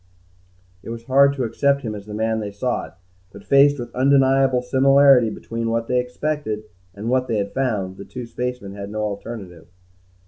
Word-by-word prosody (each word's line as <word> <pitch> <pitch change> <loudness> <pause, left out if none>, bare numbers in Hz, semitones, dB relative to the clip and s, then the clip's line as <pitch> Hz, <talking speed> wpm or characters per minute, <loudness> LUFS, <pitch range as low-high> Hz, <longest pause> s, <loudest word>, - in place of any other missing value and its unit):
It - - -10
was 115 0 -6
hard 140 +3 +4
to 135 -2 -3
accept 140 +4 +1
him 110 -3 -3
as 105 -1 -9
the 105 - -6
man 110 +1 0
they 105 -1 -4
sought, 105 -1 -4 0.3
but, 100 - -13
faced 140 +1 +5
with 120 -2 -7
undeniable 135 -1 +3
similarity 135 -1 +5
between 115 +1 -4
what 115 0 -1
they 125 0 +2
expected 125 -3 -3 0.3
and 105 +3 -6
what 130 +1 +1
they 110 - -1
had 100 -1 -3
found, 105 -8 -2
the 100 - -9
two 125 -1 -7
spacemen 125 -3 -5
had 100 0 -7
no 105 +1 -3
alternative. 100 -5 -6
120 Hz, 180 wpm, -21 LUFS, 105-135 Hz, 0.3 s, faced